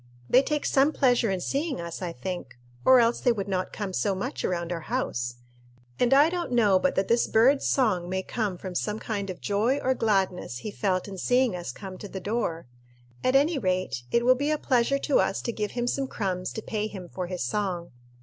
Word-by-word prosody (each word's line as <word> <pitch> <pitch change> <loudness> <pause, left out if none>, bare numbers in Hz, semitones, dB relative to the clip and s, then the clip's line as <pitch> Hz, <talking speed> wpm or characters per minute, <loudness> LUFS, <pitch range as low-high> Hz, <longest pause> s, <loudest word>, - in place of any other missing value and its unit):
They 255 - +6
take 300 +1 -2
some 275 +2 +3
pleasure 245 -6 +2
in 190 -2 -1
seeing 280 - -2
us, 170 +1 -6
I 175 -2 -3
think, 150 -3 -6 0.3
or 260 -1 +7
else 235 0 +2
they 245 - +4
would 205 -4 -2
not 185 -2 -2
come 200 -3 -5
so 195 +1 0
much 190 - -4
around 170 -1 -2
our 170 - -2
house; 120 - -2 0.6
and 245 - +3
I 280 +3 +7
don't 345 -4 -3
know 210 -6 +4
but 275 - +1
that 195 - +1
this 235 0 +3
bird's 260 +6 +4
song 195 -10 +1
may 190 0 -1
come 205 -3 -2
from 185 0 -7
some 210 +4 -2
kind 205 -3 -4
of 185 - -6
joy 215 +7 +1
or 260 -2 +1
gladness 195 - 0
he 215 - -6
felt 190 -2 -1
in 195 -2 -7
seeing 250 0 +2
us 175 -7 -5
come 190 +6 -9
to 205 - -7
the 190 - -6
door. 195 -5 -2 0.6
At 255 - +2
any 290 +2 +3
rate, 185 - -1
it 235 - +2
will 255 - +7
be 285 +4 -1
a 305 - +2
pleasure 260 -1 +2
to 275 0 +2
us 190 +1 +1
to 235 - -1
give 210 -2 -3
him 240 -1 -1
some 270 +2 -1
crumbs 185 -6 -3
to 220 - -5
pay 215 -1 -2
him 190 -4 -8
for 180 0 -5
his 180 -3 -3
song." 180 +3 -2
210 Hz, 225 wpm, -27 LUFS, 185-250 Hz, 0.6 s, or